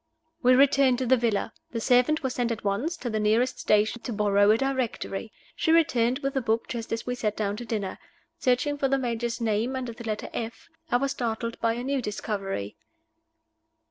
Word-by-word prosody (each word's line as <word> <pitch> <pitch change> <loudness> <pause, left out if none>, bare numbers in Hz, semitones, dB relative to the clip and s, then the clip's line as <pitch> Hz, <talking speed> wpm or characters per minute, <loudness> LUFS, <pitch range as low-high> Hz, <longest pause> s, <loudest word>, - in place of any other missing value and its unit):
We 255 0 +6
returned 270 -1 +5
to 260 - -1
the 260 +2 +5
villa. 225 -3 0 0.2
The 230 - -1
servant 250 +7 +3
was 260 -1 -1
sent 240 -2 0
at 230 - -4
once 230 - -1
to 260 - -6
the 215 - 0
nearest 225 +4 +2
stationer's 215 +3 +2
to 245 - -3
borrow 205 -1 +3
a 215 - +6
Directory. 245 -5 -2 0.2
She 320 - +1
returned 255 -7 +3
with 275 0 -1
the 270 - 0
book 225 -1 0
just 230 -2 -5
as 225 0 -2
we 250 - -1
sat 215 -4 -2
down 205 -1 -1
to 240 - -6
dinner. 210 -4 -3 0.4
Searching 265 +3 +1
for 275 - +2
the 275 +1 +2
Major's 240 -2 -2
name 230 +3 0
under 250 -3 -4
the 235 - -10
letter 215 -1 -3
F, 225 0 -5 0.2
I 245 - +4
was 275 +2 -1
startled 230 -1 -3
by 230 0 +2
a 240 +1 -4
new 275 0 0
discovery. 195 - -4
235 Hz, 205 wpm, -27 LUFS, 215-260 Hz, 0.4 s, We